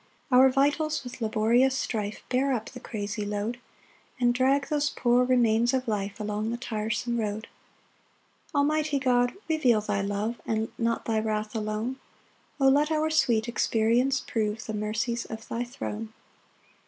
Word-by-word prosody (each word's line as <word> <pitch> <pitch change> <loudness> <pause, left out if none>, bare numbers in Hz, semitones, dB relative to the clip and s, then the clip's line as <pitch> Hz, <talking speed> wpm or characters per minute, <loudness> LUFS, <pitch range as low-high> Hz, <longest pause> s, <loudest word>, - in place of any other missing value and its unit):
5 250 - +7
[Our 265 +1 +8
vitals 290 +3 +1
with 250 0 -9
laborious 230 +4 +3
strife 210 -4 -3
Bear 265 +2 +2
up 225 -3 -3
the 250 - -9
crazy 210 -2 -4
load, 210 +3 -3 0.6
And 240 -1 +3
drag 270 +3 +2
those 295 -1 +1
poor 245 0 +2
remains 240 -1 +3
of 255 -1 -2
life 200 -2 -2
Along 210 +1 -2
the 235 - -2
tiresome 235 0 -2
road.] 215 0 -3 1.0
6 - - -17
Almighty 300 +1 +2
God, 245 -2 +2 0.2
reveal 270 -9 +3
thy 205 -1 -1
love, 205 +4 -2
And 220 0 -1
not 230 0 0
thy 220 -1 +1
wrath 215 0 -2
alone; 215 +4 -2 0.6
O 270 - +4
let 290 +3 +4
our 315 0 +1
sweet 235 -7 +2
experience 235 +3 +2
prove 220 -1 -2
The 220 - -4
mercies 220 +3 -2
of 220 0 -8
thy 235 +1 -2
throne! 225 -3 -6
235 Hz, 155 wpm, -27 LUFS, 215-260 Hz, 1.0 s, Our